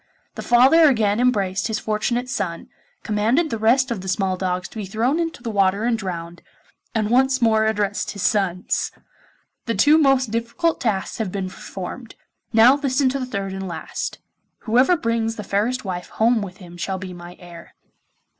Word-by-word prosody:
The - - -7
father 270 +7 +6
again 215 -4 +1
embraced 195 -7 +1
his 220 -1 -2
fortunate 235 +4 -1
son, 175 -9 -4 0.3
commanded 230 +10 +1
the 225 - -2
rest 245 +4 +3
of 220 -5 -3
the 190 - -8
small 190 0 0
dogs 180 -1 -2
to - - -12
be 205 -3 -4
thrown 235 - 0
into 330 -7 -3
the 230 - -3
water 200 0 +2
and 240 0 +2
drowned, 175 -5 -6 0.5
and 215 -1 0
once 260 +1 +3
more 220 -2 +3
addressed 205 -2 -1
his 200 - -5
sons. 190 -4 0 0.8
'The 230 - 0
two 300 +2 +5
most 270 -5 +3
difficult 235 +9 -1
tasks 210 -3 -2
have 215 -5 -2
been 190 -1 -4
performed. 200 +7 -8 0.4
Now 235 +4 +6
listen 275 -1 +1
to 275 +2 -2
the 255 - -4
third 195 -5 -4
and 190 0 -5
last: 170 - -5 0.4
whoever 255 +10 +3
brings 230 -3 -1
the 210 - -6
fairest 215 +5 -1
wife 180 -2 -5
home 230 0 +2
with 190 -2 -7
him 175 -2 -12
shall 190 +2 -3
be 185 0 -7
my 175 0 -11
heir. 175 -1 -13
220 Hz, 180 wpm, -22 LUFS, 190-250 Hz, 0.8 s, father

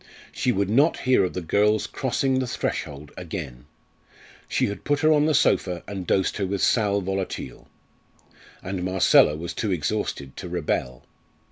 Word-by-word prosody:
She 125 - 0
would 100 -3 0
not 140 +10 +3
hear 130 -4 +3
of 90 - -2
the 90 - -3
girl's 105 +5 +2
crossing 130 0 0
the 130 - -2
threshold 75 -9 -4
again; 75 -8 -7 0.8
she - - +1
had 100 -2 -5
put 145 0 0
her 155 0 +4
on 150 0 +3
the 155 - +2
sofa 90 -2 +2
and 95 -3 -6
dosed 95 -1 +1
her 100 - -1
with 100 0 -2
sal 100 -3 +2
volatile. 95 -9 -4 1.0
And 95 -1 -4
Marcella 90 -4 +4
was 85 +2 -5
too 105 - -2
exhausted 75 -5 -2
to - - -6
rebel. 60 0 -2
95 Hz, 160 wpm, -24 LUFS, 85-110 Hz, 1.0 s, her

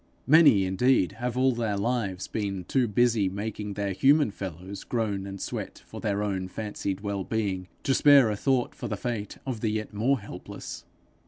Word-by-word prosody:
Many 140 - +6
indeed 95 +2 +2
have 125 0 -2
all 130 +1 +4
their 115 -4 -1
lives 100 -4 -1
been 100 -3 -3
too 125 +6 +1
busy 110 -2 +2
making 105 +1 -5
their 100 -1 -1
human 140 +4 +4
fellows 95 0 -7
groan 105 -5 -2
and 100 0 -7
sweat - - -5
for - - -9
their 105 0 0
own 95 -3 -2
fancied 100 -1 -4
well 100 -2 -2
being, 95 -4 -2 0.2
to 135 - +2
spare 140 -5 +6
a - - -1
thought 130 +3 +1
for - - -6
the - - -3
fate 115 -4 -4
of 125 -5 -4
the 110 - +1
yet 110 0 -3
more 120 +6 +1
helpless. 100 -3 -8
105 Hz, 180 wpm, -27 LUFS, 100-120 Hz, 0.2 s, Many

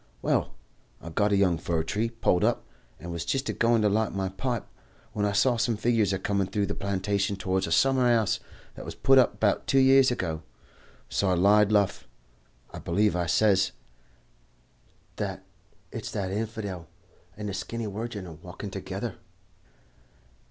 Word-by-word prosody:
Well, - - 0 0.4
I 85 - -9
got 105 +5 +1
a 100 - +3
young 90 -5 +2
fir 80 -1 -1
tree 105 +7 -1
pulled 115 -6 +1
up, - - +1 0.3
and 85 - -7
was 85 -1 -3
jist 135 +9 -1
a - - 0
going 115 -1 +2
to - - +4
light 110 +1 0
my 95 -1 -2
pipe, 120 +3 -3 0.5
when 105 -1 0
I - - 0
see 110 +5 +3
some 115 -2 +1
figures 110 -3 +2
a 95 - 0
comin' 100 0 -1
threw 100 0 -1
the 100 - -3
plantation 100 +1 -1
towards 95 -1 -1
a - - -5
summer 130 +6 +3
'ouse 115 -4 +2 0.3
that - - -9
was - - -7
put 135 0 +5
up 105 -5 +2
'bout 105 -3 +1
two 135 - +2
year 135 0 +7
ago. 85 -10 -2 0.7
So 100 - 0
I 90 - +3
lied 105 +3 +4
luff. 100 -2 +1 0.7
'I - - -6
believe,' 100 +3 +1
I 90 -1 -1
says, 95 0 +3 1.4
'that - - -4 0.5
it's - - -5
that 95 -2 -3
hinfidel 100 -5 -4 0.5
and 105 0 -5
the 100 - -3
skinny 110 +4 -4
wirgin 105 -1 -5
a 85 - -9
walkin' 80 - -9
together.' - - -5
100 Hz, 175 wpm, -27 LUFS, 95-115 Hz, 1.4 s, year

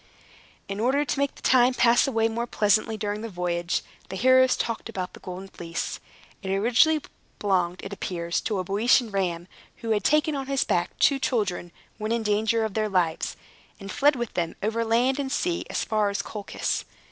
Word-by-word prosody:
In 195 +1 -4
order 270 +6 +2
to 280 - -2
make 280 0 0
the - - -16
time 255 0 +4
pass 240 +2 +4
away 225 -4 +2
more 235 +1 -3
pleasantly 215 0 +2
during 210 0 -3
the 230 - -5
voyage, 175 -2 -1 0.3
the - - -5
heroes 260 +4 +5
talked 230 -1 -3
about 185 -1 -4
the - - -12
Golden 185 +1 -7
Fleece. 170 -3 -5 0.4
It 190 - -5
originally 245 +10 +3 0.3
belonged, 185 -3 0
it 195 - -6
appears, 170 -3 -2
to 215 - -2
a 185 - -1
Boeotian 220 +5 +2
ram, 175 -3 -1 0.4
who 225 - -1
had 210 -2 +1
taken 305 +3 +2
on 270 -1 -4
his 275 -1 +1
back - - -1
two 275 -2 +4
children, 200 -9 -1 0.3
when 215 +1 -2
in 230 -1 0
danger 220 +2 +1
of 215 - -4
their 215 0 0
lives, 175 -4 0 0.4
and 195 -1 -7
fled 290 +1 +3
with 240 -3 -4
them 170 -2 -2
over 225 +2 0
land 245 +4 +2
and 270 -2 -2
sea 345 +4 -1
as - - -1
far 215 -2 +1
as 200 - -2
Colchis. 210 -2 -3
215 Hz, 195 wpm, -26 LUFS, 195-245 Hz, 0.4 s, heroes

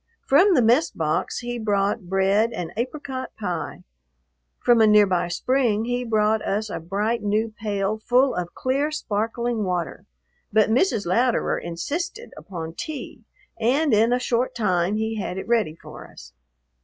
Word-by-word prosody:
From 360 +8 +5
the 250 - +4
mess 245 +9 +4
box 155 +6 -2
he 240 0 -4
brought 200 -4 0
bread 195 +4 +2
and 170 -2 -5
apricot 260 +2 -4
pie. 180 -5 -4 0.7
From 240 -2 +4
a 220 - +6
near 210 -1 +6
by 180 -3 0
spring 230 +2 +1
he 245 +1 -1
brought 215 -1 +1
us 210 +1 -2
a - - -3
bright, 205 +7 -1
new 215 +2 0
pail 205 0 -1
full 255 +4 +3
of 175 -1 -4
clear, 275 +3 0
sparkling 230 -4 -2
water, 180 -3 -3 0.4
but 215 0 +3
Mrs. 235 - +2
Louderer 235 +7 +1
insisted 330 - -5
upon 165 -4 -7
tea 280 - -7 0.3
and 265 +5 +2
in 225 +3 +4
a 245 - +3
short 250 0 -1
time 185 -3 +1
he 220 0 -2
had 180 - -4
it 190 +1 -5
ready 225 -10 +1
for - - -12
us. - - -14
220 Hz, 155 wpm, -23 LUFS, 195-245 Hz, 0.7 s, a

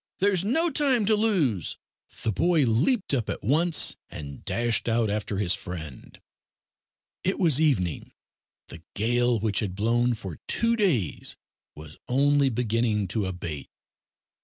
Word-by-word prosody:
there's 190 -2 +2
no 320 - +1
time 265 -6 +2
to 215 +1 +3
lose." 170 - 0 0.5
The 110 - +1
boy 160 - +2
leaped 145 - +1
up 120 -6 0
at - - -4
once, 160 - +3
and 70 -2 -9
dashed 120 0 0
out 115 -2 +1
after 105 -1 -2
his 95 -3 +2
friend. 80 -7 -7 1.0
It 190 - 0
was 160 -6 +3
evening. 100 - 0 0.6
The 80 - -10
gale, 120 +2 +1
which 105 -1 0
had 100 -5 -3
blown 120 +4 +1
for 95 -8 -8
two 230 0 +1
days 160 - 0 0.4
was 75 0 -12
only 140 +2 +3
beginning 115 -4 0
to 100 0 -1
abate. 85 -6 -6
120 Hz, 135 wpm, -26 LUFS, 100-165 Hz, 1.0 s, to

